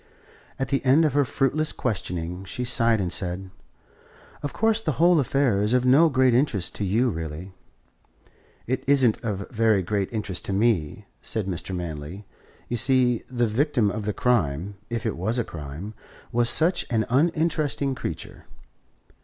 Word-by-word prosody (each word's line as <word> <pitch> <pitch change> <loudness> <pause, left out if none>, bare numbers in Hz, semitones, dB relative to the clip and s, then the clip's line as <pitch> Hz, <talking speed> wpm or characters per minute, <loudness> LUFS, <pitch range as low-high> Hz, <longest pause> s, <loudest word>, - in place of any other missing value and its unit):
At 135 -1 -3
the 135 - 0
end 140 +5 +4
of 150 - +1
her 145 0 +3
fruitless 145 +4 0
questioning 90 -5 -3
she 125 +5 -4
sighed 115 -2 +2
and 90 -3 -1
said: 95 +1 -4 0.9
"Of 145 - -3
course, 225 0 +1
the 155 -8 -1
whole 170 +4 +4
affair 130 -6 +1
is 105 +3 +1
of 125 0 +2
no 145 +6 +6
great 130 -3 +3
interest 115 - +1
to - - -2
you 115 +6 +1
really." 80 +2 -6 1.1
"It 130 +2 -2
isn't 135 -5 +3
of 100 -3 -3
very 110 -4 +2
great 100 +1 -2
interest 105 -6 -3
to 100 - -2
me," 100 -7 0 0.2
said 110 -3 -2
Mr. 95 0 -4
Manley. 85 +3 -6 0.4
"You 120 - -2
see, 125 -1 +3
the 120 -1 0
victim 120 -1 +1
of 105 0 -5
the 105 - 0
crime, 95 - 0 0.2
if 120 0 -3
it 110 - -1
was 110 +8 -1
a 120 - +1
crime, 80 +5 -8 0.4
was 120 0 +3
such 165 +8 +4
an 110 -2 +1
uninteresting 155 0 +1
creature. - - -7
115 Hz, 160 wpm, -24 LUFS, 95-135 Hz, 1.1 s, no